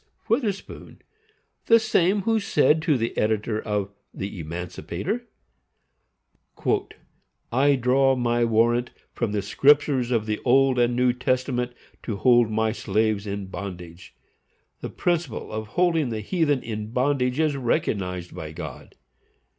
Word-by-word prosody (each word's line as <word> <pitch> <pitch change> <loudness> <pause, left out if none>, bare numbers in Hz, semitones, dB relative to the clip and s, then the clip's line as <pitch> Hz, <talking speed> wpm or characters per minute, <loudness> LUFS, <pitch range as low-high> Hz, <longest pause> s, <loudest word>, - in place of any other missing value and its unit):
Witherspoon, 205 -8 -3 0.7
the 230 - +7
same 200 -3 +2
who 225 +1 +2
said 155 -5 +3
to 155 -3 +2
the 115 -1 -2
editor 110 0 0
of 105 -2 -2 0.2
the 100 0 -6
Emancipator, 90 - -5 2.2
"I 140 +4 +4
draw 135 +1 +3
my 120 -1 +1
warrant 120 +2 +2 0.2
from 120 -4 -2
the 105 -1 -1
Scriptures 140 -3 +3
of 115 -4 0
the 105 -1 -2
Old 130 0 +4
and 120 0 +2
New 125 0 +3
Testament 125 0 -1 0.3
to 110 - -4
hold 120 +1 +4
my 110 0 +1
slaves 110 -1 0
in 100 0 -4
bondage. 90 -3 -8 0.6
The - - -5
principle 170 -8 -2
of 110 0 -4
holding 165 -6 +2
the 110 -2 -3
heathen 145 - 0
in 105 -2 -5
bondage 125 +1 0
is 155 -2 +2
recognized 95 -8 -2
by 80 -1 -7
God. 80 -5 -9
120 Hz, 130 wpm, -24 LUFS, 105-140 Hz, 2.2 s, the